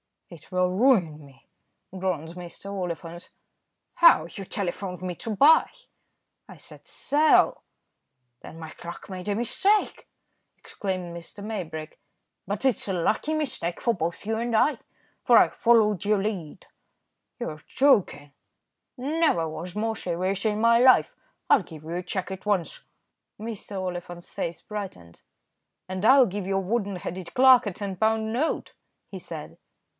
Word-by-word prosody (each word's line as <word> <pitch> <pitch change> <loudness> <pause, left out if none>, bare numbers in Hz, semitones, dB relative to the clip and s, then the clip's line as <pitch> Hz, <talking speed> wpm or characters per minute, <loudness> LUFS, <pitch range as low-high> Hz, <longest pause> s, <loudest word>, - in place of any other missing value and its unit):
"It 170 -4 -14
will 180 0 +1
ruin 185 - +2
me," 135 -1 -19 0.5
groaned 175 -3 -3 0.3
Oliphant. 175 -3 -5 0.7
"How? 335 - +6
you 195 - -8
telephoned 180 -1 -4
me 180 -1 -3
to 220 +5 -5
buy." 300 +9 +6 0.8
"I - - -12
said - - -15
'sell.'" 300 +2 +3 0.8
"Then - - -11
my 160 -1 -8
clerk 170 +5 -10
made 185 +1 -7
a 205 - 0
mistake," 390 - +1 0.5
exclaimed 185 -3 -5 0.3
Maybrick; 165 -7 -6 0.5
"but 205 +1 -3
it's 260 -5 +1
a 195 - -1
lucky 215 - 0
mistake 260 - -2
for 235 - +2
both 170 -1 -4
you 220 +1 -1
and 235 0 -1
I, 290 +7 +3 0.4
for - - +5
I - - +6
followed 215 -5 +3
your 210 0 +3
lead." 190 -8 -5 0.7
"You're 155 -1 -6
joking!" 200 - +2 0.7
"Never 275 - +1
was 170 +4 -7
more 220 +1 -1
serious 185 +2 -2
in 215 0 0
my 230 0 +5
life. 255 +1 +5 0.4
I'll - - +6
give 160 -4 -12
you 160 - -8
a 180 - -2
cheque 185 +1 -4
at 190 +1 -7
once." 200 -5 -1 0.6
Mr. 210 -3 -6
Oliphant's 175 -1 -6
face 170 - -4
brightened. 190 - -8 0.7
"And 185 +2 -3
I'll 265 +2 +7
give 195 -1 -4
your 195 0 0
wooden 200 0 -1
headed 180 0 -6
clerk 255 -2 +6
a 200 - -3
ten 195 0 -5
pound 220 +1 +1
note," 295 +7 -1 0.4
he - - -7
said. - - -9
195 Hz, 140 wpm, -26 LUFS, 175-225 Hz, 0.8 s, I'll